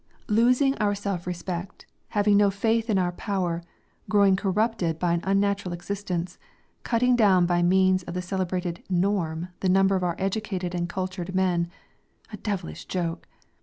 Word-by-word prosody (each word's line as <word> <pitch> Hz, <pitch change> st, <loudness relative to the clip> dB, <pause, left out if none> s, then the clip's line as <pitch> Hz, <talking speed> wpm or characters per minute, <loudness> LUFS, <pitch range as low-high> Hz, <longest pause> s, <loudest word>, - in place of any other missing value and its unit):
Losing 250 Hz, +5 st, +3 dB
our 205 Hz, -1 st, +1 dB
self 195 Hz, -3 st, -4 dB
respect, 180 Hz, +1 st, -5 dB, 0.2 s
having 205 Hz, 0 st, +2 dB
no 205 Hz, 0 st, +5 dB
faith 225 Hz, +3 st, 0 dB
in 205 Hz, -, +3 dB
our 180 Hz, -1 st, +1 dB
power, 180 Hz, -3 st, -2 dB, 0.5 s
growing 200 Hz, -2 st, +5 dB
corrupted 195 Hz, -3 st, 0 dB
by 170 Hz, 0 st, +1 dB
an 170 Hz, -, +1 dB
unnatural 195 Hz, -1 st, +1 dB
existence, 180 Hz, -1 st, -4 dB, 0.4 s
cutting 245 Hz, +1 st, +2 dB
down 195 Hz, -6 st, +5 dB
by 175 Hz, 0 st, +2 dB
means 185 Hz, +1 st, +4 dB
of 175 Hz, 0 st, -8 dB
the 180 Hz, -, -1 dB
celebrated 180 Hz, -2 st, -2 dB
"norm" 180 Hz, -3 st, 0 dB
the 190 Hz, -, 0 dB
number 195 Hz, +1 st, +4 dB
of 185 Hz, -, -1 dB
our 175 Hz, -2 st, 0 dB
educated 190 Hz, -2 st, -2 dB
and 175 Hz, -1 st, -2 dB
cultured 185 Hz, 0 st, -4 dB
men 180 Hz, -2 st, +2 dB, 0.7 s
a -, -, -5 dB
devilish 190 Hz, -, -4 dB
joke! 170 Hz, -3 st, -3 dB
190 Hz, 155 wpm, -26 LUFS, 175-205 Hz, 0.7 s, no